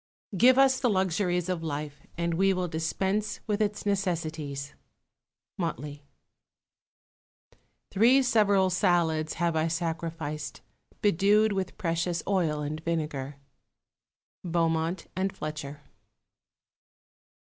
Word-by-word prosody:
Give 250 +6 +6
us 270 -1 +5
the 245 - +2
luxuries 185 -2 +1
of 180 -3 -2
life, 150 -2 -5
and 170 0 0
we 195 +3 +3
will 180 -1 -1
dispense 190 +6 -1
with 210 -1 -1
its 210 -1 -1
necessaries. 160 -8 -2 0.9
Motley. 145 +2 -4 1.8
Three 240 +7 +5
several 205 -6 +3
salads 170 -4 +1
have 170 -1 0
I 160 +1 +2
sacrificed, 165 -2 -4 0.4
bedew'd 205 +3 +4
with 190 -2 -3
precious 170 0 -1
oil 170 -6 +1
and 150 +1 -3
vinegar. 150 -4 -3 1.1
_Beaumont 165 0 0
and 190 +1 0
Fletcher. 150 -2 -6
170 Hz, 100 wpm, -28 LUFS, 155-195 Hz, 1.8 s, Give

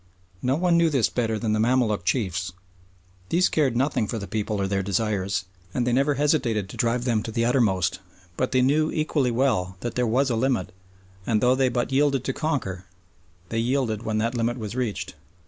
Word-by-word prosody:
No 130 +1 +1
one 170 +1 +2
knew 165 -1 +4
this 135 -7 +2
better 115 -3 -1
than 110 0 -1
the 110 - +1
Mamaluk 115 -4 +2
chiefs. 95 -3 -1 0.8
These 180 +2 +3
cared 140 -6 +1
nothing 130 -4 +1
for 115 - -3
the 100 - -5
people 105 +1 -2
or 100 - +1
their 95 0 0
desires, 100 0 -1 0.3
and 125 - +1
they 125 - +1
never 140 +3 +2
hesitated 130 - +1
to - - -9
drive 120 0 0
them 115 -4 +1
to 115 - -6
the 115 +1 0
uttermost, 95 -8 +2 0.4
but 130 - -1
they 130 -1 +3
knew 155 +4 +3
equally 155 -4 0
well 115 -7 0
that 120 - -3
there 125 -1 0
was 130 +4 +2
a - - +1
limit 120 -5 0 0.6
and, 110 -3 +2
though 125 +3 +4
they 130 0 +2
but 120 +1 -1
yielded 135 -1 +2
to 135 - -2
conquer, 100 - -2 0.6
they 115 - -1
yielded 120 -3 0
when 110 -2 -2
that 115 +2 0
limit 120 0 -1
was 110 -1 -5
reached. 125 -5 -3
120 Hz, 200 wpm, -25 LUFS, 105-135 Hz, 0.8 s, knew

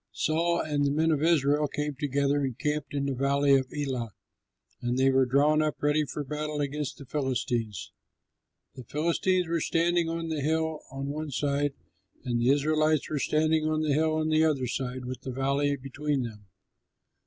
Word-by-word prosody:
Saul 170 +2 +1
and 145 -2 -1
the 140 - +2
men 160 +3 +2
of 150 -2 +1
Israel 150 -2 +3
came 150 +1 -3
together 140 +1 0
and 130 -3 -3
camped 150 -1 -2
in 140 -1 0
the 140 - -1
valley 140 +2 +2
of 130 -1 0
Elah; 130 -6 -3 0.7
and 120 +1 -1
they 135 +1 +4
were 130 -1 +3
drawn 145 +4 +3
up 155 -1 0
ready 150 +1 +2
for 145 +1 -5
battle 150 +1 -4
against 145 -1 -3
the 140 - -10
Philistines. 125 -6 -2 0.8
The 130 - -10
Philistines 170 - +1
were 165 -1 0
standing 170 +1 +1
on 165 0 -3
the 155 -2 -2
hill 160 +1 0
on 135 -1 -5
one 155 +1 -4
side, 140 +1 0 0.5
and 120 -2 -1
the 120 - +3
Israelites 155 +2 +2
were 150 - 0
standing 155 +2 +2
on 155 0 0
the 150 -2 +1
hill 155 +2 +2
on 155 0 0
the 155 0 +4
other 145 -5 +1
side 125 0 -3
with 130 0 -6
the - - -6
valley 140 +2 0
between 140 +1 -2
them. 105 -4 -8
145 Hz, 185 wpm, -28 LUFS, 135-155 Hz, 0.8 s, they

